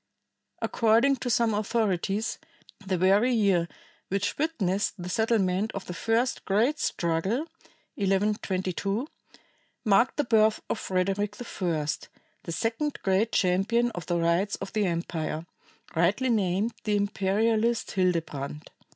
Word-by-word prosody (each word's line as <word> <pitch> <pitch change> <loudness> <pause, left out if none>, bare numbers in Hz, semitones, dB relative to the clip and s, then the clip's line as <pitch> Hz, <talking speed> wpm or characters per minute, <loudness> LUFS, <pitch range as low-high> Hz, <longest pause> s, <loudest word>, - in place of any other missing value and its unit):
According 230 +5 +3
to 245 - -4
some 230 -1 +2
authorities, 210 0 0 0.4
the 190 -1 -1
very 200 +7 +4
year 195 -7 +2 0.4
which 200 +1 -1
witnessed 205 - 0
the 180 -1 -6
settlement 215 -1 +1
of 195 - -5
the 180 - -6
first 230 +6 0
great 230 +10 +2
struggle 180 - 0 0.5
(1122), 195 +1 0 0.8
marked 215 +4 +3
the 295 - +2
birth 220 -3 +3
of - - -1
Frederick 195 +2 -1
I, 175 -10 -2 0.6
the - - -4
second 230 - -1
great 195 +4 +2
champion 200 +6 +2
of 175 -6 -7
the 175 - +1
rights 170 +4 +1
of - - -7
the 210 -3 +1
empire, 165 -2 -3 0.5
rightly 195 +11 +2
named 205 0 +1
the 210 -1 +1
imperialist 215 +3 +1
Hildebrand. 160 -6 -2
200 Hz, 120 wpm, -27 LUFS, 185-225 Hz, 0.8 s, very